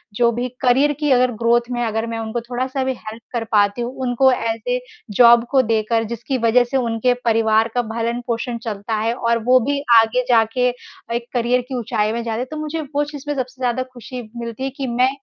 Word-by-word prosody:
जो 235 Hz, +1 st, +3 dB
भी 245 Hz, +2 st, -2 dB
करियर 265 Hz, +3 st, +4 dB
की 295 Hz, -2 st, +1 dB
अगर 250 Hz, -1 st, +4 dB
ग्रोथ 235 Hz, +1 st, +2 dB
में 240 Hz, 0 st, -2 dB
अगर 225 Hz, 0 st, -1 dB
मैं 230 Hz, 0 st, -4 dB
उनको 225 Hz, +1 st, -3 dB
थोड़ा-सा 255 Hz, +3 st, -3 dB
भी 260 Hz, 0 st, 0 dB
हेल्प 220 Hz, +1 st, -9 dB
कर 235 Hz, -2 st, -1 dB
पाती 205 Hz, +2 st, +3 dB
हूँ, 240 Hz, +2 st, -3 dB
उनको 255 Hz, +2 st, +4 dB
एज़ 230 Hz, -1 st, -2 dB
अ -, -, -1 dB, 0.4 s
जॉब 235 Hz, 0 st, +7 dB
को 270 Hz, -2 st, +5 dB
देकर 225 Hz, -1 st, 0 dB
जिसकी 240 Hz, +4 st, -3 dB
वज़ह 240 Hz, +1 st, +4 dB
से 270 Hz, -, +2 dB
उनके 235 Hz, 0 st, +1 dB
परिवार 225 Hz, -1 st, +3 dB
का 245 Hz, -, +3 dB
भरण-पोषण 235 Hz, +1 st, -2 dB
चलता 220 Hz, 0 st, -3 dB
है 225 Hz, +2 st, 0 dB
और 235 Hz, -2 st, 0 dB
वो 255 Hz, +2 st, +5 dB
भी 285 Hz, 0 st, +1 dB, 0.2 s
आगे 225 Hz, +3 st, +2 dB
जाके 235 Hz, +1 st, +3 dB, 0.5 s
एक 235 Hz, 0 st, -3 dB
करियर 245 Hz, 0 st, +2 dB
की 265 Hz, -, -3 dB
ऊँचाई 215 Hz, -2 st, -1 dB
में 235 Hz, -, -3 dB
जा 225 Hz, -1 st, -3 dB
रहे। 250 Hz, +3 st, -2 dB
तो 310 Hz, +4 st, -8 dB
मुझे 310 Hz, +1 st, -3 dB
वो 290 Hz, -, +3 dB
चीज़ 290 Hz, -2 st, -9 dB
में 290 Hz, -, -1 dB
सबसे 255 Hz, 0 st, -5 dB
ज़्यादा 250 Hz, 0 st, 0 dB
ख़ुशी 250 Hz, +1 st, -8 dB
मिलती 235 Hz, +2 st, -6 dB
है 270 Hz, -, -1 dB
कि 270 Hz, -, -3 dB
मैं 250 Hz, +2 st, +2 dB
240 Hz, 215 wpm, -20 LUFS, 225-255 Hz, 0.5 s, जॉब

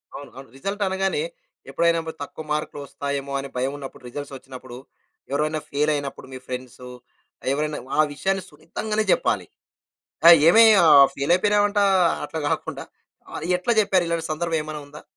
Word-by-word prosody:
అవును. 140 Hz, -, -9 dB
అవును. 135 Hz, -1 st, -11 dB
రిజల్ట్ 200 Hz, +8 st, -3 dB
అనగానే, 190 Hz, -, -1 dB, 0.5 s
ఎప్పుడైనా 170 Hz, 0 st, +2 dB
బద్ 160 Hz, 0 st, -7 dB
తక్కువ 155 Hz, +2 st, -9 dB
మార్కులు 150 Hz, -1 st, -3 dB
వస్తాయేమో 140 Hz, 0 st, -5 dB
అని 135 Hz, 0 st, -6 dB
భయం 130 Hz, +2 st, 0 dB
ఉన్నప్పుడు, 135 Hz, -2 st, -10 dB
రిజల్ట్స్ 145 Hz, +2 st, -7 dB
వొచ్చినప్పుడు, 130 Hz, -2 st, -11 dB, 0.5 s
ఎవరివైనా 155 Hz, +2 st, -1 dB
ఫేలయినప్పుడు, 145 Hz, -2 st, -2 dB
మీ -, -, -6 dB
ఫ్రెండ్సు, 125 Hz, 0 st, -7 dB, 0.6 s
ఎవరైనా 150 Hz, +1 st, -2 dB, 0.2 s
ఆ -, -, +9 dB
విషయాన్ని 190 Hz, +5 st, -1 dB
సున్నితంగానే 210 Hz, +7 st, -3 dB
చెప్పాలి. -, -, 0 dB, 0.8 s
అయ్! 170 Hz, 0 st, +11 dB
ఏమి 225 Hz, +6 st, +7 dB, 0.2 s
ఆహ్, 140 Hz, -3 st, +8 dB
ఫెయిలయిపోయినావంట! 205 Hz, +7 st, +2 dB, 0.5 s
అట్లా 160 Hz, -, -5 dB
కాకుండా, -, -, -3 dB, 0.5 s
ఆహ్, -, -, -5 dB
ఎట్ల 180 Hz, +6 st, -1 dB
చెప్పేరు? 190 Hz, -3 st, +1 dB
ఇలాంటి 170 Hz, -1 st, -2 dB
సందర్భం 165 Hz, +1 st, -1 dB
ఏమనా 155 Hz, 0 st, -6 dB
ఉందా? 150 Hz, +1 st, -13 dB
155 Hz, 140 wpm, -23 LUFS, 140-180 Hz, 0.8 s, అయ్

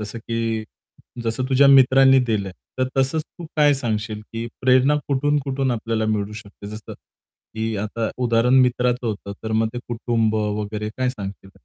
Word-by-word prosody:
जसं 105 Hz, +2 st, -6 dB
की 115 Hz, -1 st, -2 dB, 0.6 s
जसं 115 Hz, +3 st, -1 dB
तुझ्या 135 Hz, +1 st, +5 dB
मित्रांनी 135 Hz, 0 st, +6 dB
दिलं. 105 Hz, -4 st, -1 dB, 0.3 s
तर 130 Hz, 0 st, +1 dB
तसंच 135 Hz, +4 st, +1 dB
तू 170 Hz, -, -12 dB
काय 145 Hz, -1 st, +5 dB
सांगशील 110 Hz, -4 st, -3 dB
की 115 Hz, +1 st, -4 dB
प्रेरणा 130 Hz, +3 st, +4 dB
कुठून-कुठून 140 Hz, -1 st, 0 dB
आपल्याला 115 Hz, -1 st, -1 dB
मिळू 105 Hz, -1 st, -1 dB
शकते? 105 Hz, -2 st, -11 dB
जसं 110 Hz, +1 st, -8 dB
की 110 Hz, 0 st, -8 dB
आता 110 Hz, +2 st, -2 dB
उदाहरण 120 Hz, +1 st, +3 dB
मित्राचं 125 Hz, -1 st, +1 dB
होतं. 100 Hz, -2 st, -4 dB
तर 110 Hz, -, -3 dB
मग 110 Hz, 0 st, +2 dB
ते -, -, -2 dB
कुटुंब 115 Hz, -2 st, 0 dB
वगैरे 105 Hz, 0 st, -2 dB
काय 130 Hz, 0 st, +1 dB
सांगशील? 100 Hz, -4 st, -8 dB
115 Hz, 155 wpm, -22 LUFS, 110-130 Hz, 0.6 s, मित्रांनी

